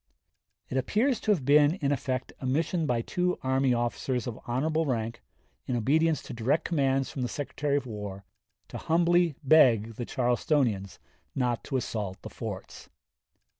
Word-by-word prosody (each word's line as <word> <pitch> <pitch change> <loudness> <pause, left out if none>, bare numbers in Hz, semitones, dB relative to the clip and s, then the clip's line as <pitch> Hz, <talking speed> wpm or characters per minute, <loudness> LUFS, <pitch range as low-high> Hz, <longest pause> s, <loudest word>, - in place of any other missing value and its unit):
It 130 - -3
appears 220 - +1
to 215 - +1
have 165 -11 +1
been, 145 +3 +5
in 145 -7 -1
effect, 130 -2 -2
a 130 - -4
mission 160 +4 0
by 120 -3 0
two 180 +4 -1
army 130 0 +2
officers 120 +1 -1
of 120 -3 -5
honorable 155 +6 0
rank, 115 -2 -2 0.5
in 125 - -1
obedience 155 +7 +2
to - - -8
direct 120 +7 0
commands 135 -5 +1
from 135 - -5
the 125 - 0
Secretary 145 +2 -2
of 140 - -3
War, 105 -4 -7 0.4
to - - -6
humbly 170 -1 +2
beg 115 -7 +5
the 120 - -3
Charlestonians 120 - 0 0.4
not 125 -3 0
to 135 - -1
assault 105 -6 -4
the - - -8
forts. - - -7
130 Hz, 160 wpm, -28 LUFS, 120-155 Hz, 0.5 s, been